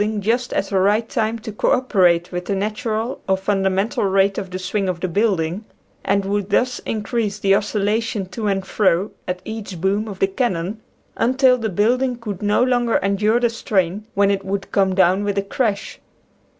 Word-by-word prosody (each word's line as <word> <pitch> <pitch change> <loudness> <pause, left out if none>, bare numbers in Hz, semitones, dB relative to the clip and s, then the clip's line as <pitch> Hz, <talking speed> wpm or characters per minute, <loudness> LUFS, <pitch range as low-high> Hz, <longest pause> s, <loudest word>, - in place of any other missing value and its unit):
79 215 +1 0
ing 205 - -2
just 240 +4 0
at - - 0
the 195 -1 0
right 210 +4 +2
time 220 +1 -1
to 220 -1 -7
co 210 - +1
operate 185 -10 +2
with 180 0 -4
the 200 - -1
natural 215 +4 -2
or 190 - +3
fundamental 195 +2 0
rate 195 0 +2
of 190 -2 -6
the 185 - -4
swing 190 +1 -2
of 180 -2 -3
the 185 - -1
building, 190 -1 0 0.4
and 200 0 +1
would 200 0 -1
thus 250 +4 +1
increase 215 -1 -2
the 195 -2 +2
oscillation 210 +1 0
to 200 +4 -4
and 195 -1 0
fro 190 0 +1 0.2
at 180 0 -3
each 215 -5 -6
boom 200 +4 0
of 200 -3 -7
the 195 - +3
cannon 195 -1 -2 0.4
until 260 +1 +4
the 225 -3 -2
building 245 +7 +1
could 210 -5 -6
no 210 +3 +2
longer 245 -2 +1
endure 210 +4 +2
the 240 - +3
strain, 205 -2 -1
when 200 0 +3
it 195 -1 -1
would 195 0 -4
come 190 -2 +2
down 185 +1 +3
with 205 -1 -2
a 200 - +1
crash. 205 0 -2
205 Hz, 195 wpm, -20 LUFS, 190-220 Hz, 0.4 s, until